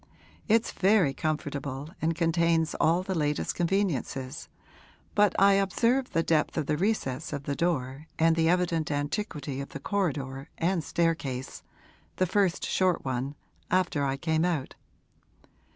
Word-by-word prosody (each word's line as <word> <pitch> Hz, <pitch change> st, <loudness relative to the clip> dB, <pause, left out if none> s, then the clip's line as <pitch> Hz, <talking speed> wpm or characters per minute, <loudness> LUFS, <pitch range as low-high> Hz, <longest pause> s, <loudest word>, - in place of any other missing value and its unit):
'It's 225 Hz, 0 st, +3 dB
very 190 Hz, -7 st, +3 dB
comfortable 145 Hz, -1 st, -3 dB
and 165 Hz, +1 st, +1 dB
contains 165 Hz, -1 st, +2 dB
all 170 Hz, +3 st, +3 dB
the 190 Hz, -, -3 dB
latest 150 Hz, -3 st, 0 dB
conveniences, 170 Hz, -, -1 dB, 0.6 s
but 205 Hz, -2 st, +3 dB
I 200 Hz, 0 st, +6 dB
observed 230 Hz, +7 st, +1 dB
the 165 Hz, -, +2 dB
depth 160 Hz, -1 st, +1 dB
of 155 Hz, -, 0 dB
the 150 Hz, -, 0 dB
recess 160 Hz, -, -1 dB
of 140 Hz, -, -4 dB
the 140 Hz, 0 st, -2 dB
door 145 Hz, -3 st, -1 dB
and 165 Hz, 0 st, +4 dB
the 165 Hz, 0 st, +2 dB
evident 170 Hz, -3 st, +1 dB
antiquity 145 Hz, -2 st, -3 dB
of 140 Hz, -, -7 dB
the -, -, -7 dB
corridor 140 Hz, -7 st, -2 dB
and 170 Hz, 0 st, 0 dB
staircase 145 Hz, -6 st, -1 dB, 0.5 s
the 185 Hz, -, +2 dB
first 185 Hz, -1 st, +1 dB
short 185 Hz, -5 st, +1 dB
one 130 Hz, +2 st, -2 dB, 0.3 s
after 175 Hz, -5 st, +1 dB
I 135 Hz, 0 st, 0 dB
came 160 Hz, +2 st, 0 dB
out. 165 Hz, -7 st, -1 dB
165 Hz, 140 wpm, -28 LUFS, 140-180 Hz, 0.6 s, I